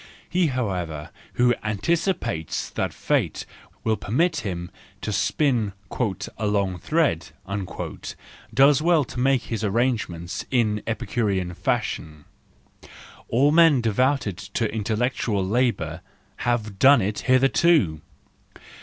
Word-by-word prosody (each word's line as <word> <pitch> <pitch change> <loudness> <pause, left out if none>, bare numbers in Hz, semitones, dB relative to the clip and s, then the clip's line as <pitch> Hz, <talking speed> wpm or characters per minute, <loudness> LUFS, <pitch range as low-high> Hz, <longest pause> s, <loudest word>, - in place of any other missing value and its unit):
He, 180 -1 +2
however, 90 - -3 0.2
who 120 0 +3
anticipates 110 - -1
that - - -2
fate - - -1 0.4
will 110 -1 +1
permit 160 - +1
him 90 - -4 0.3
to 110 - -3
spin 115 -3 +1
" 100 - -33 0.5
a 105 - 0
long 100 -3 0
thread," 90 - +1 1.2
does 135 +4 +5
well 165 -2 +4
to 125 - -7
make 135 0 +2
his 115 -2 -4
arrangements 105 -6 -1
in 110 -5 +1
Epicurean 100 -4 -1
fashion; 75 -2 -2 1.0
all 135 +5 +4
men 165 -4 +6
devoted 115 -2 +1
to 105 +3 -3
intellectual 110 -2 -1
labour 100 -7 0 0.4
have 110 -5 -2
done 135 -4 +6
it 105 +2 -2
hitherto 130 - +4
110 Hz, 110 wpm, -24 LUFS, 95-135 Hz, 1.2 s, men